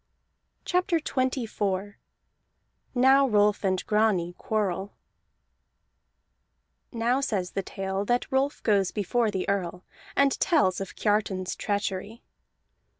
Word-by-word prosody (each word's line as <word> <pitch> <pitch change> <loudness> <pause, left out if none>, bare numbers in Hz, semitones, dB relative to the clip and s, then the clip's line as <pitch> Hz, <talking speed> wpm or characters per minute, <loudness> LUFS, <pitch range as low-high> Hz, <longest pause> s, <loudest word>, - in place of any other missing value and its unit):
CHAPTER 360 -1 +1
XXIV 220 -8 -2 1.0
NOW 265 +2 +5
ROLF 210 -1 +3
AND 185 -2 0
GRANI 210 -5 +1
QUARREL 200 -2 -2 2.0
Now 240 +3 +1
says 195 -9 -1
the 195 - -2
tale 195 +1 -3
that 245 +3 0
Rolf 270 +2 0
goes 200 -4 +3
before 220 +3 0
the 190 -3 -3
Earl, 180 -2 -2 0.3
and 280 -1 +3
tells 195 - +2
of 195 - -6
Kiartan's 205 -3 0
treachery. 205 +2 -3
210 Hz, 100 wpm, -27 LUFS, 190-245 Hz, 2.0 s, NOW